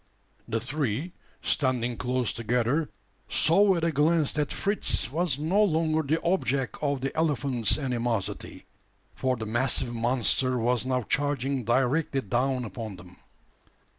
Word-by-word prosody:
The 115 0 -1
three, 135 - -2 0.3
standing 125 -4 0
close 125 -1 -1
together, 120 +7 0 0.4
saw 195 +4 +4
at 170 - -2
a 165 - +2
glance 155 +1 +2
that 150 -1 -1
Fritz 200 - -1
was 160 -2 0
no 175 +8 +2
longer 160 -4 +2
the 155 +2 0
object 140 - 0
of 140 -3 0
the 135 - -3
elephant's 140 -7 +1
animosity: 120 -7 -3 0.5
for 130 -1 0
the 110 -2 -5
massive 120 +2 +1
monster 125 +2 +1
was 120 +1 0
now 130 -1 0
charging 140 -1 -1
directly 135 +4 +1
down 125 +3 0
upon 110 -2 -6
them. 90 0 -14
130 Hz, 135 wpm, -27 LUFS, 120-155 Hz, 0.5 s, saw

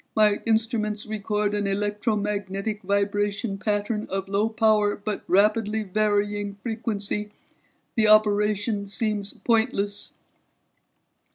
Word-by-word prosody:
My 210 -1 +4
instruments 220 -2 0
record 210 -1 -1
an 205 -1 0
electromagnetic 205 0 -2
vibration 200 +1 -1
pattern 210 +1 -1
of 195 0 -3
low 200 +3 +1
power 215 -2 +3
but 205 0 -4
rapidly 215 +2 +2
varying 205 0 0
frequency. 210 -1 -3 0.7
The 220 -2 +3
operation 210 0 +3
seems 205 0 -2
pointless." 215 -3 0
210 Hz, 95 wpm, -25 LUFS, 205-215 Hz, 0.7 s, My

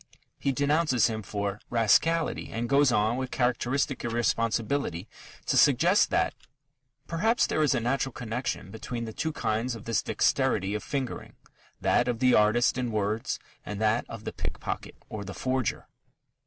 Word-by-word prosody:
He 140 - +1
denounces 145 -1 +2
him 110 -2 -1
for 100 0 -3
"rascality" 155 +8 +2
and 115 +1 -2
goes 140 0 +4
on 110 +2 +2
with 130 -1 -3
characteristic 125 +2 0
irresponsibility 115 -3 0 0.4
to - - 0
suggest - - +5
that - - +1 0.7
"perhaps... 220 +10 +2
there 155 - 0
is 150 -2 +3
a - - +1
natural 130 +3 0
connection 120 +2 -4
between 115 +2 -5
the 110 - -7
two 160 - -2
kinds 115 -2 -1
of 110 - -10
this 115 -2 +1
dexterity 95 +2 +1
of 105 - -2
fingering 135 -3 -4 0.4
that - - +2
of 120 -2 0
the 125 +1 +4
artist 115 +4 +3
in 125 -2 -1
words, 110 +1 -1 0.3
and 105 -1 -6
that 110 +2 +2
of - - -8
the - - -5
pickpocket - - -5
or 105 -2 -6
the 100 -1 -8
forger." 130 +2 -1
120 Hz, 155 wpm, -28 LUFS, 110-130 Hz, 0.7 s, suggest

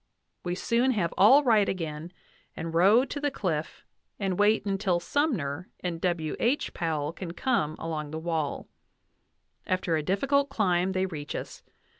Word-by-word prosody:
We 175 0 -2
soon 240 +6 +1
have 175 -7 -1
all 265 +9 +7
right 220 -6 +4
again, 160 -2 -4 0.5
and 165 0 -4
row 200 +9 +5
to 290 - -6
the 290 - +1
cliff, 165 - -3 0.3
and 195 -2 -1
wait 210 +1 +3
until 195 -3 0
Sunnier 180 - -1
and 170 -2 -3
[W. 170 -4 -1
H.] 260 +5 0
Powell 155 -3 -2
can 170 -1 -7
come 175 - 0
[along 155 -2 -4
the 155 - -5
wall]. 160 -3 -2 1.0
After 185 -2 0
a 155 - 0
difficult 275 - +1
climb 185 -6 +1
they 185 0 +1
reach 150 -5 -6
us. - - -6
180 Hz, 155 wpm, -28 LUFS, 160-215 Hz, 1.0 s, all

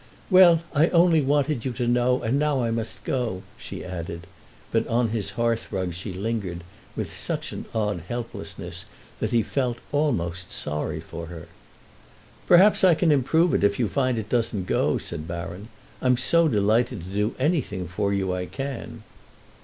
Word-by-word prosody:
"Well, 175 -3 +7
I 155 +2 +4
only 170 -2 +4
wanted 140 -2 +1
you 130 - -2
to 120 0 -2
know, 125 +1 +2
and 125 +5 +1
now 145 -4 +1
I 115 - 0
must 115 -1 -4
go," 115 -8 -2
she - - -8
added; 85 -2 -6 0.5
but - - +1
on 115 0 +1
his 110 -3 -1
hearthrug 110 -6 -1
she 95 +4 -6
lingered 95 -3 -3 0.3
with - - -4
such - - -2
an - - -6
odd 105 -5 -1
helplessness 120 +1 -6 0.3
that - - -1
he 115 -2 +2
felt 125 -2 -1
almost 90 - -1
sorry 75 0 -2
for 85 0 -8
her. 80 -2 -9 1.0
"Perhaps 190 +4 +6
I 180 -3 +7
can 165 0 +3
improve 160 +5 +3
it - - +2
if 100 0 +3
you 120 - +1
find 130 +2 0
it 110 -2 -3
doesn't 110 -5 0
go," - - +1
said 75 +1 -6
Baron. 85 +5 -6 0.3
"I'm 125 -1 +3
so 170 +6 +4
delighted 110 - +1
to 95 +2 -8
do 105 +1 0
anything 130 - 0
for 100 +3 -1
you 95 -2 0
I 90 0 -3
can." 135 -2 -6
115 Hz, 170 wpm, -25 LUFS, 95-135 Hz, 1.0 s, Well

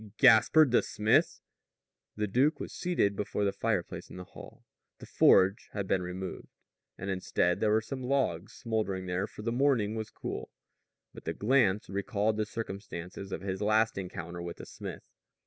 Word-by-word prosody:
"Gaspard 140 +5 +6
the 120 - +5
smith?" 105 +1 +2 0.7
The 105 - -1
duke 130 +10 +2
was - - -6
seated 170 - 0
before 105 0 -1
the 100 - +2
fireplace - - -2
in - - -10
the 90 - -6
hall. - - -13 0.3
The - - -11
forge 95 +2 +4
had 100 -2 -3
been 95 - +1
removed; 90 +1 -6 0.5
and 95 +2 -4
instead 90 -1 0
there 110 - +2
were 110 +1 +3
some 130 +4 -6
logs 125 -10 0
smoldering 110 -6 -2
there, 90 +3 -1
for 105 - -10
the 115 - -1
morning 120 -5 +2
was 110 -1 -4
cool. - - -6 0.6
But - - -12
his - - -2
glance 105 -4 +2
recalled 100 +2 -1
the 110 -1 -1
circumstances 95 -3 -6
of - - -4
his 95 0 -4
last 110 +2 +3
encounter 90 -2 -6
with 85 0 -6
the - - -9
smith. - - -8
105 Hz, 170 wpm, -30 LUFS, 95-110 Hz, 0.7 s, Gaspard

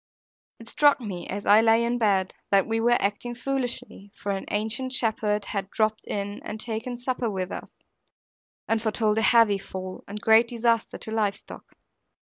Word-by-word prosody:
It 230 - -13
struck 290 +4 +4
me, 190 -8 -6
as 200 +1 -5
I 210 +2 +7
lay 225 +1 +4
in 240 +1 -1
bed, 195 -4 +2 0.2
that 195 -1 +4
we 225 0 -1
were 240 +1 +3
acting 210 +4 -2
foolishly; 245 -6 -3
for 200 - -3
an 195 -1 -3
ancient 220 +5 -2
shepherd 215 -4 0
had 195 -1 -4
dropped 215 0 0
in 205 0 -4
and 215 - -6
taken 230 +2 -4
supper 245 -1 -2
with 185 -2 -3
us, - - -7 1.0
and 225 -1 +1
foretold 220 -1 +1
a - - +1
heavy 220 -3 +5
fall 185 -1 -7
and 205 +1 -6
great 220 +2 +5
disaster 230 -1 0
to 220 - -8
live 210 -3 +1
stock. - - -12
220 Hz, 175 wpm, -26 LUFS, 205-235 Hz, 1.0 s, I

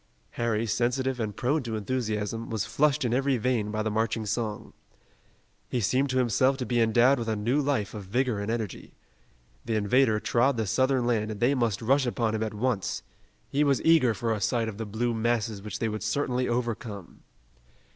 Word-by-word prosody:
Harry, 115 -1 -1
sensitive 125 +3 0
and 105 -3 -3
prone 145 +5 0
to 115 -3 -4
enthusiasm, 110 -1 -2
was 110 -3 -2
flushed 145 +4 +1
in 120 - 0
every 135 +1 +2
vein 115 -2 0
by 110 0 -2
the 110 - -1
marching 110 0 -1
song. 105 0 -3 1.0
He 125 - -1
seemed 130 +6 +1
to 130 - 0
himself 130 +2 +2
to 130 - -3
be 120 -1 +1
endowed 120 +4 +4
with 115 - -4
a 110 - 0
new 120 +8 +1
life 135 -8 -1
of 105 -3 -7
vigor 120 +2 0
and 100 +1 -3
energy. 115 -4 -4 0.7
The 115 -1 -1
invader 110 +2 +3
trod 120 +4 +2
the 110 - 0
Southern 130 +4 +1
land 110 -3 0
and 105 -2 -5
they 120 +4 +3
must 115 -4 0
rush 135 +3 +3
upon 115 -2 0
him 110 - -2
at 110 -1 -3
once. 110 -3 -1 0.4
He 145 +2 +1
was 140 -3 +2
eager 150 -9 +4
for 115 -1 -1
a 105 - -4
sight 115 +3 +1
of 110 -1 -6
the 115 - -4
blue 115 +3 -1
masses 115 -2 -1
which 105 0 -5
they 115 - -1
would 110 -1 -4
certainly 125 +3 0
overcome. 115 -5 -4
115 Hz, 195 wpm, -27 LUFS, 110-130 Hz, 1.0 s, endowed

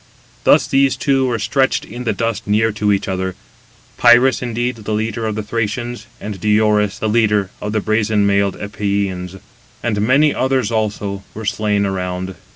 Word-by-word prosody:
Thus 150 - +5
these 135 -1 +2
two 135 -2 +1
were 120 -2 0
stretched 135 +5 +1
in 120 +3 -8
the 110 - +1
dust 115 0 -2
near 110 +2 +2
to 105 0 0
each 100 - 0
other; 95 0 -2 0.6
Pirus, 120 +2 +5
indeed, 120 0 -2
the 110 0 -4
leader 110 +1 -2
of 110 - -2
the 110 - -3
Thracians, 115 +2 -3
and 105 -2 -6
Diores, 105 -1 +2
the 110 - -2
leader 105 -3 +2
of 105 - -3
the 110 0 0
brazen 110 -1 +1
mailed 100 -1 +1
Epeans; 100 -3 -2 0.5
and 105 -3 0
many 140 +7 +4
others 130 -3 0
also 105 -3 -2
were 110 +1 -6
slain 105 -2 0
around. 95 -1 -3
110 Hz, 165 wpm, -18 LUFS, 100-120 Hz, 0.6 s, Thus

